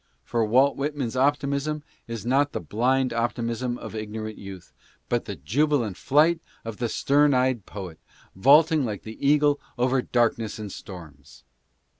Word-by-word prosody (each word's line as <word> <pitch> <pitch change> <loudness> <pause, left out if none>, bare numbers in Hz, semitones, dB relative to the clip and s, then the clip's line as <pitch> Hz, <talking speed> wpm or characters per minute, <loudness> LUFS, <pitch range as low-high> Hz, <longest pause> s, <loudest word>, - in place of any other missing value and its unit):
For 115 - 0
Walt 130 +6 +3
Whitman's 140 -4 -2
optimism 145 +2 0 0.2
is 115 -1 -6
not 140 +4 +2
the - - -2
blind 125 - 0
optimism 120 +1 -2
of - - -8
ignorant 110 0 -5
youth, 95 -3 -10 0.4
but - - 0
the - - -5
jubilant 120 - 0
flight 155 - +3 0.3
of 115 -2 -6
the 120 -1 -2
stern 145 +2 +3
eyed 125 -4 +1
poet, 95 -5 -8 0.4
vaulting 150 - +5
like 105 -5 -4
the 110 +4 -10
eagle 145 0 +3 0.2
over 130 +1 +2
darkness 115 -3 0
and 105 -2 -6
storms. 70 -11 -11
120 Hz, 145 wpm, -25 LUFS, 110-140 Hz, 0.4 s, vaulting